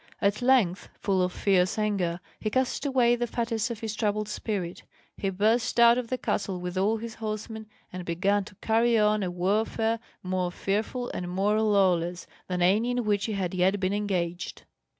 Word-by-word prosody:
At 205 Hz, +2 st, +1 dB
length, 245 Hz, -8 st, +2 dB
full 195 Hz, -2 st, +1 dB
of 180 Hz, 0 st, +1 dB
fierce 185 Hz, 0 st, +2 dB
anger, 190 Hz, -5 st, 0 dB, 0.2 s
he 215 Hz, -, -1 dB
cast 260 Hz, +4 st, 0 dB
away 245 Hz, -3 st, +3 dB
the 240 Hz, 0 st, -2 dB
fetters 230 Hz, 0 st, -1 dB
of 235 Hz, -1 st, -6 dB
his 220 Hz, -2 st, -3 dB
troubled 215 Hz, -1 st, -1 dB
spirit, 200 Hz, -5 st, -4 dB, 0.3 s
he 195 Hz, -, -2 dB
burst 220 Hz, +6 st, +1 dB
out 235 Hz, +1 st, +7 dB
of 245 Hz, -, -4 dB
the 255 Hz, -, -2 dB
castle 195 Hz, -5 st, -2 dB
with 180 Hz, 0 st, -5 dB
all 205 Hz, +4 st, +2 dB
his 230 Hz, 0 st, -6 dB
horsemen, 220 Hz, 0 st, -5 dB, 0.3 s
and 185 Hz, 0 st, -5 dB
began 195 Hz, +4 st, +1 dB
to 205 Hz, -, -13 dB
carry 230 Hz, +1 st, +3 dB
on 210 Hz, 0 st, +3 dB
a 185 Hz, -, -1 dB
warfare 220 Hz, +5 st, 0 dB, 0.2 s
more 185 Hz, -1 st, -1 dB
fearful 220 Hz, +7 st, -2 dB
and 175 Hz, -1 st, -4 dB
more 205 Hz, +4 st, +1 dB
lawless 180 Hz, -5 st, +2 dB, 0.2 s
than 180 Hz, -1 st, -1 dB
any 210 Hz, +7 st, +3 dB
in 245 Hz, 0 st, 0 dB
which 205 Hz, -1 st, +1 dB
he 220 Hz, -, -2 dB
had 190 Hz, -3 st, -2 dB
yet 185 Hz, +2 st, +2 dB
been 190 Hz, +1 st, 0 dB
engaged. 185 Hz, -4 st, -2 dB
205 Hz, 185 wpm, -27 LUFS, 185-225 Hz, 0.3 s, out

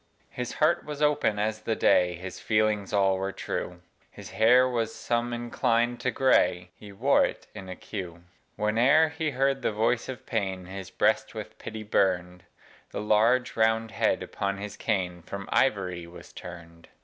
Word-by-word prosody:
His 125 Hz, -1 st, -5 dB
heart 170 Hz, +3 st, +2 dB
was 150 Hz, -1 st, -7 dB
open 145 Hz, -8 st, +2 dB
as 110 Hz, +1 st, -1 dB
the 110 Hz, -, -1 dB
day, 90 Hz, -4 st, +3 dB
His 90 Hz, +1 st, -8 dB
feelings 105 Hz, -2 st, +1 dB
all 95 Hz, -2 st, +2 dB
were 95 Hz, +1 st, -2 dB
true: 90 Hz, -2 st, -5 dB, 0.3 s
His -, -, -11 dB
hair 125 Hz, +4 st, +5 dB
was 115 Hz, -3 st, -2 dB
some 120 Hz, 0 st, -1 dB
inclined 120 Hz, 0 st, 0 dB
to 125 Hz, -, 0 dB
gray 90 Hz, -8 st, +2 dB
He 105 Hz, -1 st, -12 dB
wore 125 Hz, +8 st, +3 dB
it -, -, -3 dB
in 95 Hz, -, -9 dB
a 95 Hz, -, -5 dB
queue. 90 Hz, -5 st, -7 dB, 0.3 s
Whene'er 125 Hz, +10 st, +4 dB
he 160 Hz, 0 st, -2 dB
heard 135 Hz, 0 st, 0 dB
the -, -, 0 dB
voice 115 Hz, +4 st, 0 dB
of 130 Hz, -3 st, -7 dB
pain, 95 Hz, -4 st, -2 dB
His 95 Hz, 0 st, -8 dB
breast -, -, +1 dB
with -, -, -8 dB
pity 110 Hz, -1 st, -7 dB
burn'd: 90 Hz, -3 st, 0 dB, 0.4 s
The -, -, -5 dB
large, 115 Hz, +4 st, +2 dB
round 110 Hz, 0 st, +2 dB
head -, -, +1 dB
upon 100 Hz, 0 st, -3 dB
his 100 Hz, 0 st, -6 dB
cane 90 Hz, -5 st, -2 dB
From 100 Hz, +3 st, -7 dB
ivory 90 Hz, -9 st, +1 dB
was 85 Hz, -, -13 dB
turn'd. 85 Hz, -2 st, -11 dB
105 Hz, 170 wpm, -27 LUFS, 95-120 Hz, 0.4 s, hair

